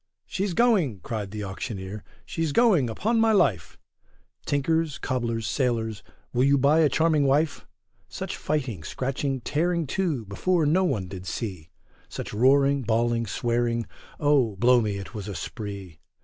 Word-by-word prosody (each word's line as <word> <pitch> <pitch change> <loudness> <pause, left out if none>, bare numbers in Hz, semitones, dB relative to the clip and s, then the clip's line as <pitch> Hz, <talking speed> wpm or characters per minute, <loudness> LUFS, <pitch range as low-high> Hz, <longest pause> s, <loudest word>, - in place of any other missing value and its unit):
She's 195 -2 -2
going, 185 - +2
cried 105 +1 -4
the 105 +1 -5
auctioneer, 100 0 -6 0.2
she's 165 -2 -2
going, 185 - +4
upon 225 - 0
my 225 0 +4
life; 100 - +1 0.7
Tinkers, 155 +2 0
coblers, 115 -3 -2
sailors, 115 -3 -1 0.3
will 125 +1 +2
you 140 +1 +4
buy 140 +4 +4
a 155 -2 +5
charming 155 +1 +2
wife? 145 +2 +1 0.4
Such - - -5
fighting, 130 - -2
scratching, 135 - -2
tearing 170 +6 0
too, 150 - -1
before 160 - 0
no 170 +6 +3
one 115 - -1
did 95 0 -8
see; 90 -9 -5 0.4
Such - - -6
roaring, 135 +5 +4
bawling, 115 0 +1
swearing, 120 0 0 0.3
O! 140 -8 +3
blow 120 +5 +4
me, 105 -2 -2
it 95 - -8
was 105 -2 -6
a 100 - -5
spree. 100 -7 -7
125 Hz, 150 wpm, -26 LUFS, 110-150 Hz, 0.7 s, a